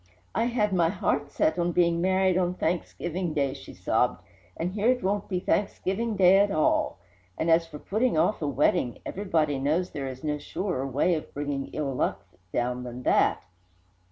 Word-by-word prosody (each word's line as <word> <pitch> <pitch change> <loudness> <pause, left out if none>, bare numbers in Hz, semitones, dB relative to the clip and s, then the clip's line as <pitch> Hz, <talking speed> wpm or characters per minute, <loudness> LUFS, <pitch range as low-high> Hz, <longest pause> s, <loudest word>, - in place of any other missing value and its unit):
"I - - +1
had 235 -3 +1
set - - 0
my 170 -2 +3
heart 145 -6 -2 0.2
on 175 0 +1
being 170 -1 +2
married 190 0 +2
on 180 -1 +1
Thanksgiving 175 0 -2
Day," 140 -2 +1
she - - -11
sobbed, - - 0 0.3
"And 175 +2 -2
here 210 +2 0
it 250 0 +2
won't 200 +1 -1
be 185 -2 0
Thanksgiving 205 +3 -1
Day 190 0 +6
at 205 +1 +4
all! 155 - +1 0.4
And 165 +1 +1
as 165 0 +4
for 150 -2 -9
putting 215 +5 0
off 210 - +2
a 150 - -1
wedding, 130 -3 +1
everybody 160 -8 0
knows 155 +7 0
there 140 -2 -4
is 130 0 -8
no 150 -1 -1
surer 165 -3 -3
way 140 +7 +2
of 155 - -4
bringing 145 -1 -3
ill 145 -3 -3
luck 95 -5 -1 0.3
down 125 +1 -1
than 125 0 -7
that! - - +3
170 Hz, 185 wpm, -27 LUFS, 145-190 Hz, 0.4 s, Day